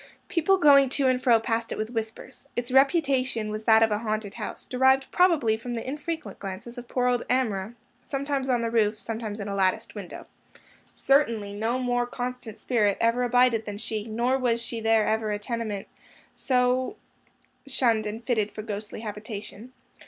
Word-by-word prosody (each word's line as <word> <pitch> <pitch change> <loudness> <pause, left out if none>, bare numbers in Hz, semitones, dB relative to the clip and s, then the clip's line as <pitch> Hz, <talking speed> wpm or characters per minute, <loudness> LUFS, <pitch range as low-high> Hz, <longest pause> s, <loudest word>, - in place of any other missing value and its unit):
People 360 +3 +3
going 280 -5 +6
to 275 +1 0
and 255 -1 +2
fro 240 -3 +5
passed 225 0 -2
it - - -3
with 215 +2 -3
whispers. 225 +2 -6
Its 240 +1 -3
reputation 265 -5 +2
was 215 0 -5
that 220 0 +6
of 220 - +2
a 210 - +1
haunted 215 -2 -3
house; - - -7
derived 265 +1 +2
probably 325 -12 +3
from 240 +2 -5
the 230 - -5
infrequent 305 +4 -5
glimpses 200 +5 -6
of 245 -1 -9
poor 250 0 0
old 245 -1 +2
Amrah, 225 -4 0 0.3
sometimes 275 0 -2
on 245 -2 +2
the 230 - -1
roof, 215 -2 +2
sometimes 220 -1 -5
in 200 - -5
a 200 - -3
latticed 200 +3 0
window. 200 -4 -8 0.7
Certainly 230 -8 +1
no 225 +4 -1
more 245 -1 0
constant 245 -2 -5
spirit 210 -5 +1
ever 230 +2 +2
abided 245 -2 +3
than 205 -1 -5
she; 215 0 -4
nor 240 +4 0
was 235 -2 0
there 225 -2 +2
ever 220 0 0
a 210 - -1
tenement 215 -2 -4 0.5
so 255 +6 +1 0.7
shunned 235 -5 +1
and 220 +3 -6
fitted 220 -4 0
for 215 - -7
ghostly 210 0 -6
habitation. 210 +1 -7
230 Hz, 175 wpm, -26 LUFS, 215-255 Hz, 0.7 s, going